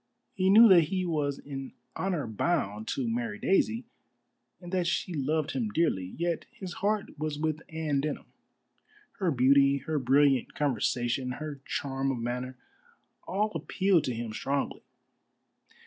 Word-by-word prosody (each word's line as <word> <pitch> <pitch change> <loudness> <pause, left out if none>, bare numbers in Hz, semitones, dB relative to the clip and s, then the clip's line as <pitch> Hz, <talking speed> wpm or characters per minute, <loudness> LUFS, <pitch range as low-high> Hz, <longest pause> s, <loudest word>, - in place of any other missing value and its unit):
He 190 -2 +1
knew 225 +4 +9
that 175 -4 +7
he 185 +3 -2
was 145 -4 -1
in 135 -2 -7 0.2
honor 185 -6 -1
bound 110 - -1
to 130 -3 -2
marry 115 -2 -2
Daisy, 225 - +1 0.7
and 175 -1 -10
that 180 -2 0
she 180 0 -1
loved 150 +1 0
him 235 -4 -1
dearly, 150 - 0
yet 170 -1 -1
his 185 -3 -8
heart 205 -6 -1
was 155 -1 -2
with 155 0 -1
Anne 155 -3 -1
Denham. 150 0 -3 0.9
Her 185 -3 +1
beauty, 140 0 +4
her 155 -2 0
brilliant 135 0 +3
conversation, 125 -2 0
her 145 0 -6
charm 135 0 -2
of 130 - -3
manner, 125 +2 -4 0.7
all 210 +3 0
appealed 190 -5 +1
to 125 - -2
him 115 -1 -5
strongly. 140 +5 -2
145 Hz, 145 wpm, -29 LUFS, 130-175 Hz, 0.9 s, knew